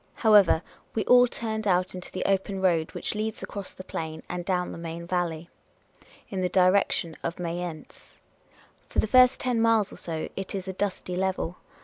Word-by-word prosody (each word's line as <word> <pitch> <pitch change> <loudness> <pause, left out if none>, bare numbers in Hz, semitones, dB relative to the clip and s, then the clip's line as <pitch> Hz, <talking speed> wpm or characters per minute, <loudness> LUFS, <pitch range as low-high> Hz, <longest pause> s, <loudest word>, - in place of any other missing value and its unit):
However, 205 -6 +5 0.3
we 215 -3 0
all 250 0 +7
turned 220 -2 -3
out 180 -1 +2
into 180 -1 -7
the - - -3
open 195 0 0
road 170 -4 +2
which - - -2
leads 215 +1 -3
across 200 -2 -6
the 185 - -10
plain 160 -3 -5
and 175 0 -4
down 180 -1 -1
the - - -8
Main 170 0 -6
Valley, 170 -2 -2 0.8
in 190 -2 -3
the 180 - +1
direction 185 -3 +2
of 170 - -3
Mayence. 170 -2 -6 0.8
For - - -8
the - - +4
first 250 +3 +5
ten 245 -3 0
miles 225 -3 +3
or - - -10
so, 160 -2 -4
it 195 0 -4
is 190 -1 -5
a 190 - -3
dusty 185 -2 -3
level. 185 -2 -1
185 Hz, 185 wpm, -27 LUFS, 170-205 Hz, 0.8 s, all